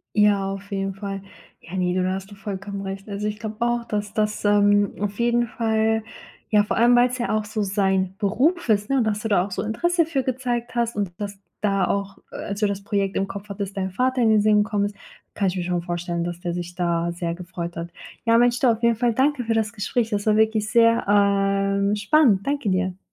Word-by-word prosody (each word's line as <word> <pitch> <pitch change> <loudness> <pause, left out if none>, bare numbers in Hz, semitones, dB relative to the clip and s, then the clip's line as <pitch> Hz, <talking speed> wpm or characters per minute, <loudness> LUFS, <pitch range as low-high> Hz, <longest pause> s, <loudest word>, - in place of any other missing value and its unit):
Ja, 205 -2 +3
auf 195 +1 -8
jeden 195 0 -2
Fall. 195 0 -5 0.4
Ja, 175 +4 -8
ne, 180 -1 0
du, 185 - +1
da 185 +1 0
hast 195 +1 -7
du - - -10
vollkommen 200 0 -6
recht. 195 +1 -6
Also 205 +1 -3
ich 210 0 -3
glaub 215 0 -7
auch, 240 0 0
dass 210 -2 -3
das, 215 0 -1
ähm, 205 -1 +4
auf 205 0 -3
jeden 240 0 +2
Fall 220 -1 0 0.5
ja, 210 -1 +4
vor 210 - -2
allem 240 +1 +5
weil's 250 +1 +3
ja 240 - -1
auch 215 - -1
so 215 0 -3
sein 190 -1 0
Beruf 260 - +1
ist, 210 -1 +2
ne? 275 - +1
Und 245 - +2
dass 215 -1 0
du 225 +1 -4
da 195 -4 +3
auch 200 - -7
so 185 - -3
Interesse 335 +10 +1
für 290 -5 -1
gezeigt 245 -2 -2
hast 235 -2 0
und 200 -3 -1
dass 205 -1 -4
du 195 - -29 0.2
da 195 -3 +1
auch, 200 0 -2 0.2
äh, - - -7
als 200 0 -5
du 210 - +3
das 200 -1 -3
Projekt 200 -2 -1
im 195 - 0
Kopf 200 +1 -8
hattest, 200 0 -5
dein 190 -1 -2
Vater 255 +6 +1
in 225 - +4
den 215 -1 +5
Sinn 210 0 +4
gekommen 205 -2 0
ist. 205 0 -7 0.4
Kann 200 -2 +1
ich 185 - -3
mir - - -1
schon 175 -1 -1
vorstellen, 175 0 -3
dass 175 0 -5
der 175 -1 -3
sich 175 0 -5
da 170 -1 0
sehr 170 -1 -3
gefreut 175 -1 -6
hat. 170 +1 -5 0.3
Ja, 230 0 +4
Mensch, 240 0 +3
du, 260 - +4
auf 230 0 +1
jeden 235 -1 +3
Fall 240 +1 +1
danke 265 +2 +1
für 230 - 0
das 220 -1 0
Gespräch. 220 +2 -1
Das 205 -2 -2
war 215 -1 +4
wirklich 220 -1 +2
sehr, 230 0 +4
ähm, 200 0 +2
spannend. 210 -2 +3
Danke 280 -6 0
dir. 185 0 -1
205 Hz, 240 wpm, -23 LUFS, 195-230 Hz, 0.5 s, allem